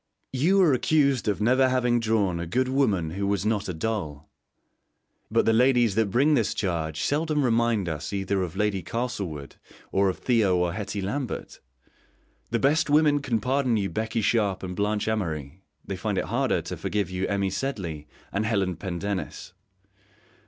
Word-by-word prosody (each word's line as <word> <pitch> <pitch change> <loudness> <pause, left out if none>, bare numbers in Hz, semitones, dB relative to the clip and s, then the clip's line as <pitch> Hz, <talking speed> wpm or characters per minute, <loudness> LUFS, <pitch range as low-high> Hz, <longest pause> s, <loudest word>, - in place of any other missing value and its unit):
You 170 +10 +3
are 155 -6 +4
accused 140 -2 +2
of 105 -1 0
never 130 +4 +4
having 125 -2 +2
drawn 105 -6 +1
a 85 - -4
good 130 +8 +1
woman 105 - +1
who 100 +3 -2
was 100 -1 0
not 105 -2 0
a - - -2
doll, 80 -6 -4 1.0
but - - +2
the 115 - +4
ladies 120 -2 +4
that 110 0 +1
bring 140 +9 +3
this 115 -7 +1
charge 80 -5 -2
seldom 150 0 +1
remind 115 -5 +2
us 80 -3 -4
either 100 -1 -1
of 90 -3 -4
Lady 105 -2 0
Castlewood 95 - -4 0.3
or 100 0 +3
of 95 - -3
Theo 110 -7 +2
or 90 -1 0
Hetty 100 -1 -4
Lambert. 130 +6 -4 0.9
The 115 - +1
best 145 +5 +2
women 150 -1 +4
can 125 -5 0
pardon 130 0 +1
you 100 -3 -1
Becky 110 +4 -2
Sharp 100 -4 +1
and 90 -1 -5
Blanche 105 +1 -1
Amory; 85 -7 -3 0.2
they - - -4
find - - -2
it - - 0
harder - - 0
to - - -6
forgive 100 -3 -2
you 90 +1 -2
Emmy 100 -1 0
Sedley 90 - -4 0.3
and 100 - 0
Helen 100 -6 0
Pendennis. 95 0 -4
105 Hz, 170 wpm, -26 LUFS, 95-125 Hz, 1.0 s, are